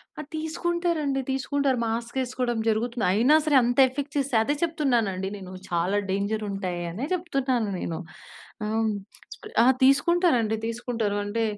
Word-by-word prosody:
అ! - - -5
తీసుకుంటారండి 320 -3 -1
తీసుకుంటారు. 275 0 0
మాస్కేసుకోడం 240 +1 -2
జరుగుతుంది. 225 0 0
అయినా 245 +9 +5
సరే 300 -2 +3
అంత 245 +1 0
ఎఫెక్ట్ 280 +2 -5
చేస్తయి. 270 -5 +2
అదే 285 - 0
చెప్తున్నానండి 240 - 0
నేను, 185 -2 -9 0.2
చాలా 175 +4 +1
డేంజర్ 200 +3 -1
ఉంటాయి 185 -3 -3
అనే 220 +11 -4
చెప్తున్నాను 270 - 0
నేను. 165 -2 -3 0.7
ఆ! - - -2 1.0
ఆ! - - +4 0.2
తీసుకుంటారండి 275 - +3
తీసుకుంటారు! 230 -3 -2
అంటే 225 +3 -1
245 Hz, 125 wpm, -26 LUFS, 215-285 Hz, 1.0 s, అయినా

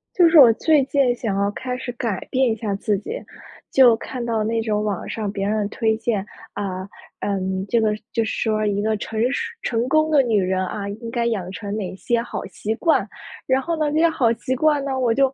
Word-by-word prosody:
就 350 -2 +6
是 320 - +7
我 245 -5 +9
最 300 +4 +3
近 270 -3 +2
想 215 -5 -2
要 200 0 +1
开 250 +3 -4
始 255 - -6
改 230 -6 -2
变 260 -2 +2
一 - - 0
下 210 -2 -2
自 205 +1 0
己， 210 - -8 0.6
就 250 -4 +6
看 245 +2 -6
到 225 -2 0
那 225 +1 0
种 210 -2 -1
网 205 -4 -3
上 210 -3 -3
别 200 0 -2
人 210 -1 0
推 220 0 0
荐， 220 -3 -1 0.3
啊， 190 -2 -4 0.4
嗯， 190 -1 -2
这 235 - +3
个 215 -1 +1 0.2
就 230 - +1
是 - - -3
说 215 -1 0
一 205 -1 0
个 215 0 0
成 220 +1 -4
熟 - - -1 0.2
成 235 +1 0
功 310 +3 +2
的 290 - +6
女 225 -6 +2
人， 185 0 0
啊， 200 +1 -4
应 225 +3 -7
该 235 -1 0
养 200 -6 -2
成 205 -2 -5
哪 200 -4 -3
一 - - -8
些 235 +4 0
好 240 - -5
习 220 +1 -4
惯， 320 +7 +2 0.4
然 260 0 +2
后 335 +2 -2
呢， 305 -1 +1
这 310 - +1
些 335 +1 +5
好 250 -7 +2
习 240 +2 -3
惯 295 +1 +2
呢， 270 -1 -2
我 240 -3 +2
就 270 +2 +2
225 Hz, 250 characters per minute, -22 LUFS, 205-260 Hz, 0.6 s, 我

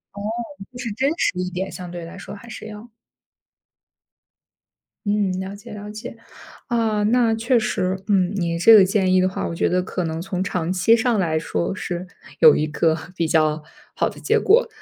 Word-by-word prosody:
哦， 200 - -7 0.5
就 245 - -10
是 245 -2 -4
真 265 +7 +1
实 180 - 0
一 180 0 -2
点， 185 +2 -4
相 180 -1 -8
对 175 -1 -7
来 175 +3 -10
说 200 - -9
还 220 +3 -13
是 220 - -8
要。 215 +2 -10 2.2
嗯， 205 -2 +1
了 190 +1 -5
解 230 +3 -12
了 210 0 -8
解。 215 +2 -8 0.5
啊， 225 -3 +1
那 230 +1 +3
确 235 +2 +2
实 190 -3 -1
嗯， 195 -2 +2
你 170 -3 -1
这 225 +7 +7
个 205 - +8
建 190 -1 +2
议 185 - +5
的 185 - +2
话， - - -3
我 - - -4
觉 165 - +1
得 180 +1 +1
可 180 - -3
能 160 -1 -3
从 185 +1 -3
长 180 -1 -2
期 190 +5 +4
上 235 -2 +1
来 160 -4 +1
说， 170 +3 -2
是 180 0 -5 0.3
有 155 -2 +8
一 150 - +1
个 160 +1 +1 0.2
比 165 - 0
较 155 -1 +2 0.3
好 - - +1
的 - - -12
结 - - +2
果。 460 +5 +4
190 Hz, 210 characters per minute, -22 LUFS, 175-220 Hz, 2.2 s, 个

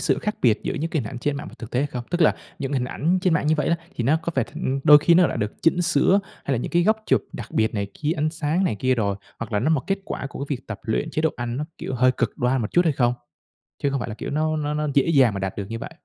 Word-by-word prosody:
sự - - +1
khác 210 0 -2
biệt 110 -4 +4
giữa - - -2
những 165 +1 -2
cái 155 -7 0
hình 105 - -6
ảnh 125 - -6
trên 145 +3 -1
mạng 145 - -6
và - - -13
thực 115 - -8
tế 125 - +1
hay 145 - +1
không? 125 -4 -6
Tức 175 0 -1
là 155 - +5 0.2
những 135 0 -3
hình 130 -3 0
ảnh 165 +8 0
trên 180 -4 +3
mạng 150 - 0
như 155 - +4
vậy 150 -3 0
á 170 - +2 0.2
thì 120 - -1
nó 145 +6 +4
có 170 - -3
phải 130 -4 +2
thành 135 +2 -3
đôi 150 0 +9
khi 170 +3 +4
nó 180 0 +6
đã - - -3
được 105 -2 -2
chỉnh 175 +2 +3
sửa, 180 +5 +3 0.2
hay 140 - -1
là 125 - +1
những - - -4
cái 175 0 +4
góc 215 +4 +3
chụp - - +3
đặc 115 - -7
biệt 110 0 +1
này 100 -1 -1
kia, 155 +1 -1
ánh 155 +1 0
sáng 160 +3 0
này 180 - +1
kia 130 +5 +1
đồ, 100 -4 0 0.2
hoặc 115 -1 -6
là 105 - +1
nó 155 +6 +1
một 150 -4 +2
kết 195 0 0
quả - - -4
của 140 - -5
cái 140 -2 -2
việc 125 - -20
tập 115 -3 -6
luyện, 130 +8 -1
chế 155 - -1
độ 160 - +3
ăn 120 0 -3
nó, 150 - -2
kiểu, 130 - -4
hơi 130 +1 +4
cực - - -2
đoan 125 +1 +1
một 105 - -2
chút, 175 +1 +3
hay 160 - +3
không? 120 -2 +2 0.7
Chứ 140 - +2
không 135 -1 -1
phải - - -4
là 105 - -5
kiểu - - -6
nó 155 +2 0
nó 150 0 -2
nó 150 0 -1
dễ 140 - +4
dàng 130 -9 +4
mà 100 - -3
đạt 95 0 -3
được 100 -2 -4
như 115 - -3
vậy. - - -7
140 Hz, 335 wpm, -23 LUFS, 120-160 Hz, 0.7 s, đôi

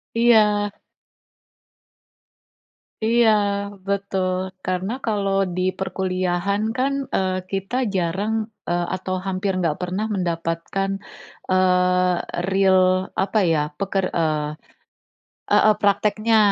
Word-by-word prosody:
Iya. 210 -3 +4 2.3
Iya 230 +1 +4 0.6
betul, 190 -2 -1
karena 185 +4 -1
kalau 200 -3 0 0.2
di 185 - -1 0.2
perkuliahan 185 +1 -1 0.2
kan, 270 +2 +1 0.2
eee, 185 -1 0
kita 195 +4 -3 0.2
jarang, 190 +5 0 0.4
eee, 175 0 0
atau 185 0 -3
hampir 195 +1 -1
nggak 165 -4 0
pernah 185 +4 -2
mendapatkan, 170 +2 -2 0.6
eee, 180 -1 +3 0.4
real 190 -1 +4 0.4
apa 200 +3 +1
ya, 155 - +2 0.2
peker 195 -1 0
eee, 155 -3 0 1.0
heeh, 215 - +5
prakteknya. 215 +2 +2
190 Hz, 90 wpm, -22 LUFS, 180-205 Hz, 2.3 s, heeh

